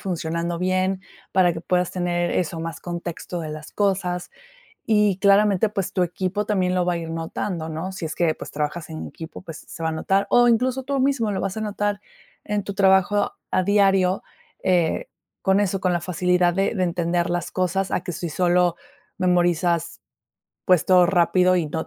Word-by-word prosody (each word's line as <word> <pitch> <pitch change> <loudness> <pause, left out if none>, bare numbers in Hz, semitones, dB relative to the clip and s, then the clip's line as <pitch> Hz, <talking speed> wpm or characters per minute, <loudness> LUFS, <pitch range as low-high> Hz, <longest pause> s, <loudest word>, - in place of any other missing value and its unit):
funcionando 170 -1 -3
bien, 185 +1 0 0.3
para 180 -2 +4
que 165 - -6
puedas 180 +1 0
tener 175 -1 -1
eso, 165 -2 -1
más 165 0 -5
contexto 175 0 -5
de 155 - -5
las 155 0 -8
cosas 185 -3 -1 0.5
y 210 -3 +2
claramente, 200 +1 +4
pues 195 -3 -3
tu 185 - +1
equipo 185 +4 -2
también 185 -3 +1
lo 180 -1 +1
va 180 - +1
a - - -2
ir 165 -1 -6
notando, 165 +1 -4
¿no?, 160 +4 -4
si 190 -2 -6
es 155 - -4
que, 170 -2 +2
pues - - -9
trabajas 150 +2 -3
en 155 - -6
equipo, 160 +2 -10
pues 165 -4 -9
se 165 - -9
va 160 - +1
a - - -1
notar, 195 +5 +1
o 245 0 +5
incluso 250 +3 +1
tú 275 +1 -1
mismo 260 -6 +1
lo 195 - -2
vas 195 +1 -3
a - - -3
notar 205 -1 -2 0.4
en 210 -1 -1
tu 200 - -5
trabajo 195 +1 +3 0.2
a 185 - +2
diario, 195 -2 +3 0.4
eh, 180 - +1 0.3
con 190 0 +3
eso, 195 -1 0
con 185 -2 +1
la 175 - 0
facilidad 180 0 +1
de 195 +4 0
de 185 -2 +1
entender 175 0 0
las 175 -1 -2
cosas 190 +1 -1
a - - 0
que 180 - -5
si 170 +2 -4
solo 175 +1 +2 0.4
memorizas, 175 -2 +1 0.6
pues 180 -4 +4
todo 180 -1 +5
rápido 180 0 +3
y 170 - 0
no 160 +2 -4
180 Hz, 190 wpm, -23 LUFS, 170-195 Hz, 0.6 s, o